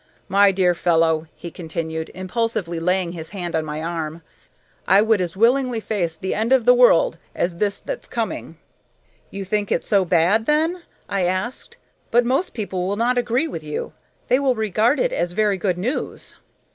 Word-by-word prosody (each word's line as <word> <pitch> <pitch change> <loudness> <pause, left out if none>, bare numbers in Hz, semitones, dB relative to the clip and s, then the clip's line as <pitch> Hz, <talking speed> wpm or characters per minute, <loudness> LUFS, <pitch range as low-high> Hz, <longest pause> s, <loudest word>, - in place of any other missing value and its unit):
My 200 +1 +5
dear 185 -2 +2
fellow," 165 -2 +2
he 170 - -8
continued, 160 -1 -5
impulsively 185 -2 -2
laying 180 +1 0
his 160 -2 -7
hand 175 -4 -4
on 160 - +1
my 155 0 -5
arm, 165 -1 -4 0.6
"I 195 +2 +6
would 220 -3 +2
as 175 0 -4
willingly 245 +2 +3
face 185 -7 -2
the 190 - -3
end 220 +3 -1
of 260 -4 +4
the 245 - +7
world 245 -9 +4 0.2
as 170 -1 -1
this 200 +2 -1
that's - - -6
coming!" - - -4 0.7
"You 195 0 -6
think 205 +1 -1
it - - 0
so 200 -2 +3
bad, 180 +5 +2
then?" 320 +4 +1 0.3
I 195 -2 0
asked. 185 +7 -3 0.3
"But 240 +1 +3
most 270 +9 0
people 190 -5 -3
will 200 - -1
not 245 +3 +1
agree 245 +6 0
with 165 - -6
you. 150 -1 -5 0.3
They 255 - +3
will 270 -3 +2
regard 220 +5 +1
it - - +1
as 175 - -1
very 210 -1 +1
good 185 -1 -1
news." 240 +11 -4
195 Hz, 180 wpm, -22 LUFS, 170-235 Hz, 0.7 s, the